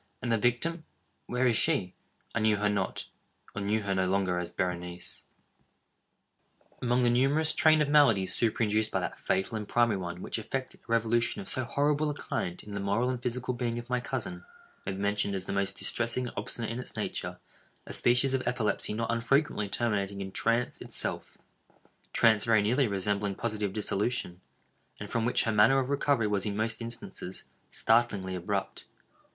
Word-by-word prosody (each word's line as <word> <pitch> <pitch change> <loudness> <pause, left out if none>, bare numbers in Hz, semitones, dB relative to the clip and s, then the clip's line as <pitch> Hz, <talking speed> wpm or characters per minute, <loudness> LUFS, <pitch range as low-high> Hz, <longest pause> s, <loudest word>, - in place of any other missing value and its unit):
—and 120 - -1
the 115 - +3
victim—where 125 0 -2
is 120 -2 +3
she? 105 - +2 0.4
I - - 0
knew 110 -1 +3
her 105 0 +1
not—or 105 0 -5
knew 105 +2 0
her 100 -1 -1
no 95 -1 +1
longer 95 -2 +1
as 90 - -4
Berenice. 90 -1 -4 1.6
Among 125 0 +2
the 120 - +4
numerous 140 +6 +2
train 155 -1 +5
of - - -2
maladies 115 -11 +4
superinduced 110 -1 +1
by - - 0
that - - -4
fatal 95 +4 -1
and 105 -1 -5
primary 115 -4 +2
one 90 0 -6
which - - -2
effected 130 +4 -5
a - - -12
revolution 115 - +2
of 195 - -7
so 130 -2 +2
horrible 145 +4 +1
a 145 - -3
kind 90 -9 -4
in 105 - -11
the 100 - -3
moral 100 +6 +1
and 125 -2 -4
physical 125 +1 -2
being 120 -1 -2
of 120 +1 -7
my 125 - +2
cousin, 115 -9 -5 0.4
may - - -1
be - - -6
mentioned 100 0 0
as 95 -1 -3
the - - -4
most 100 -1 -1
distressing 120 +2 0
and - - -13
obstinate 115 -1 -4
in 115 - -4
its 125 - -7
nature, - - -3 0.5
a - - -7
species 125 +2 +4
of 130 - +1
epilepsy 110 -3 +1
not 115 +1 -1
unfrequently 115 -2 +1
terminating 100 -3 -1
in 95 -1 -5
trance 115 +4 0
itself—trance 110 -2 -2
very 110 -3 +4
nearly 125 +5 +2
resembling 100 0 0
positive 105 -3 -2
dissolution, 105 -2 -1 0.6
and - - -7
from 115 -1 0
which 125 - +4
her 110 - 0
manner 110 +5 +5
of 135 0 0
recovery 140 -4 +2
was 105 -2 0
in 100 -1 -2
most 110 +1 -1
instances, 115 -5 -6 0.3
startlingly 110 -5 +2
abrupt. 90 -2 -3
115 Hz, 175 wpm, -29 LUFS, 100-125 Hz, 1.6 s, train